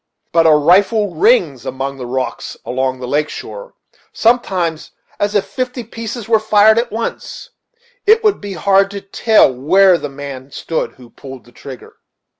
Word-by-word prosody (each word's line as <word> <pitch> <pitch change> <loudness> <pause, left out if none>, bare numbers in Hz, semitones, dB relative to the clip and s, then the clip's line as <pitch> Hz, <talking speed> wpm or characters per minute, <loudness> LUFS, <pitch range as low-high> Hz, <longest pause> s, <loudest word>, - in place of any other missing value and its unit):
But 165 -1 +3
a 155 - +6
rifle 195 +6 +3
rings 165 - +2
among 135 +1 -5
the 125 -2 -7
rocks 130 +1 -4
along 130 0 -2
the 125 - -6
lake 150 +3 0
shore, - - -9 0.4
sometimes, 185 -9 0 0.3
as 205 +1 -1
if 200 - +2
fifty 255 -1 -4
pieces 230 0 -7
were 225 -1 +3
fired 215 +1 +4
at 235 0 -3
once 230 - -6 0.6
it 445 +2 +5
would 425 -2 +1
be 205 -1 -6
hard 195 +1 +2
to 200 0 -7
tell 205 - +3
where 180 +8 +3
the 145 - -5
man 135 -1 -9
stood 160 +3 -4
who 125 -2 -17
pulled 135 0 -11
the 120 - -19
trigger." 130 0 -12
190 Hz, 165 wpm, -16 LUFS, 140-220 Hz, 0.6 s, a